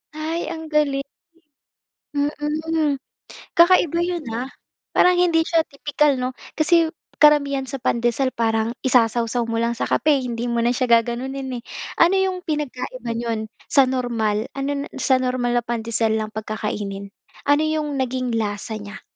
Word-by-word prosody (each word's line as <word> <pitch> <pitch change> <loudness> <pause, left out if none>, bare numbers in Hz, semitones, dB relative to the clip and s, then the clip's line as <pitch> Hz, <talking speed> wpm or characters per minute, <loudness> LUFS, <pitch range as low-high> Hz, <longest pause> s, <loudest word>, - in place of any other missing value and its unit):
Ay, 320 +2 -3
ang 320 -1 -6
galing! 280 -2 +2 1.1
Mm, 300 +1 0 0.6
kakaiba 340 -1 +5
'yon, 345 -4 -2
ah! 245 +3 -3 0.5
Parang 360 - +6
hindi 330 -2 +3
siya 330 -1 +3
tipikal 285 -1 +1
'no? 255 +1 -2 0.2
Kasi, 330 +1 +4 0.3
karamihan 285 -2 +4
sa 270 +1 -5
pandesal 240 +3 +1
parang 225 0 +1
isasawsaw 235 -1 +2
mo 230 - -2
lang 235 0 +1
sa - - -1
kape, 295 -3 +3
hindi 240 0 -3
mo 235 - 0
na 240 - +3
siya 255 -1 0
gaganunin, 255 +2 -4
eh. - - -48 0.4
Ano 345 +3 +6
yong 375 -1 0
pinagkaiba 255 -6 -3
nun 230 -2 -2 0.2
sa 275 -2 +6
normal 230 -4 -1
ano 275 +1 -1
na, - - -5
sa 265 - +3
normal 250 -1 0
na 240 - +2
pandesal 225 -1 0
lang 215 0 -4
'pag 215 0 -6
kakainin? 200 -1 -4 0.3
Ano 290 +1 +4
yong 310 -1 -1
naging 255 -1 -1
lasa 215 0 -2
niya? 205 0 -9
260 Hz, 150 wpm, -22 LUFS, 230-300 Hz, 1.1 s, Parang